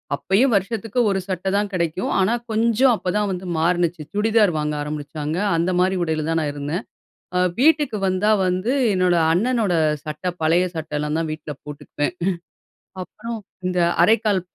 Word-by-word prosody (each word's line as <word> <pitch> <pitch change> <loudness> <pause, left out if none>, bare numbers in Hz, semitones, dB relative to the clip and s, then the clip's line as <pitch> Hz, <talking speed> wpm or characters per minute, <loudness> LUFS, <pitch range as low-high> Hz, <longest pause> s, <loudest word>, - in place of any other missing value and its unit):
அப்பயும் 220 - +2
வருஷத்துக்கு 225 +3 -1
ஒரு 195 - 0
சட்ட 185 0 -3
தான் 205 0 -1
கிடைக்கும், 170 0 -1
ஆனா 190 +5 +2 0.2
கொஞ்ச 225 +1 +1 0.2
அப்ப 185 -3 -3
தான் 210 -1 0
வந்து 185 0 -5
மாறினுச்சு. 175 0 +1
சுடிதார் 210 -3 +3
வாங்க 150 0 -1
ஆரம்பிச்சாங்க, 150 +1 -4 0.2
அந்தமாரி 180 +2 +1
உடையில 155 -2 -1
தான் 165 0 +1
நான் 150 -2 -1
இருந்தேன். 145 +7 -4 0.5
ஆ - - +3 0.2
வீட்டுக்கு 295 -6 +3
வந்தா 185 +3 +1 0.2
வந்து, 185 +7 0 0.2
என்னோட 180 -1 +2 0.2
அண்ணனோட 220 +1 +1 0.3
சட்ட 150 +4 -7 0.2
பழைய 170 +3 +3
சட்டலாம் 150 -1 -2
தான் 165 -1 -2
வீட்ல 155 -1 -6
போட்டுக்குவேன். 145 +1 -4 0.9
அப்புறம், 230 +5 -7 0.3
இந்த 180 0 -1 0.3
அரைக்கால் 210 -2 +3
185 Hz, 145 wpm, -22 LUFS, 160-210 Hz, 0.9 s, சுடிதார்